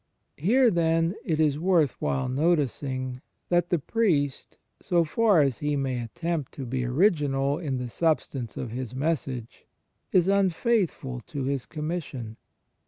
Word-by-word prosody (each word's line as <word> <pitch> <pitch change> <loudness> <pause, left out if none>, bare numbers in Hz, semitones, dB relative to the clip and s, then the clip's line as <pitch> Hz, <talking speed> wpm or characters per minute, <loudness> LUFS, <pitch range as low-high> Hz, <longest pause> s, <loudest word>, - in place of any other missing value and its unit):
Here, 235 - +4
then, 165 0 +2
it 160 -3 -1
is 150 -2 +2
worth 165 -6 +3
while 130 -1 0
noticing 130 -3 0 0.3
that 175 0 +2
the 175 - +3
priest, 150 - 0 0.2
so 175 -2 +2
far 200 +1 +3
as 135 -4 +1
he 150 0 0
may 130 -3 -1
attempt 155 +5 -3
to 135 - -6
be 125 +1 -2
original 145 - +2
in 140 -6 -2
the 125 -1 -3
substance 135 -4 -1
of 125 - -4
his 125 0 -5
message, 135 -5 -3 0.4
is 185 -1 +4
imfaithful 190 - +1
to 145 -6 -4
his 135 -1 -2
commis 165 +3 -3
sion. 115 -4 -8
150 Hz, 145 wpm, -26 LUFS, 130-170 Hz, 0.4 s, Here